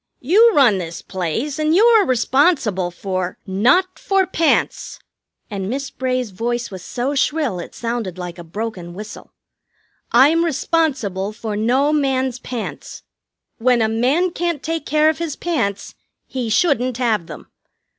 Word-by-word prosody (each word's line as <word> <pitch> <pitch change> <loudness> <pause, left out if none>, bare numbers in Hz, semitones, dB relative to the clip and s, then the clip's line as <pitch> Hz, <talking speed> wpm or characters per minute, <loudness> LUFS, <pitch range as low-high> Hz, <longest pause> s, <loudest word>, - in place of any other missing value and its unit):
You 420 - +5
run 240 -9 +5
this 170 -1 -6
place, 210 - -3
and 310 +1 +2
you 420 +5 +5
are 455 -3 +5
responsible 250 - +2
for 185 0 -4
" - - -50 0.2
"Not 370 +4 +3
for 390 -1 +2
pants." 335 -3 0 0.5
And 195 -3 -4
Miss 275 +3 -3
Bray's 255 -3 -2
voice 235 +4 -3
was 190 -2 -8
so 255 +3 -2
shrill 285 - 0
it 175 - -9
sounded 230 -6 -3
like 180 -1 -7
a - - -7
broken 180 -1 -6
whistle. 210 +3 -9 0.8
"I'm 295 +8 +5
responsible 260 - -1
for 220 -1 -5
no 255 +8 +2
man's 265 -3 0
pants. 245 -3 -7 0.6
When 245 +1 +3
a 220 - +2
man 260 +11 +1
can't 340 -4 -2
take 325 -1 -3
care 305 +1 +3
of 315 - +1
his 330 -4 -3
pants, 230 - -2 0.3
he 250 -3 -4
shouldn't 255 -1 +1
have 220 -9 0
them. - - -11
250 Hz, 150 wpm, -20 LUFS, 210-305 Hz, 0.8 s, You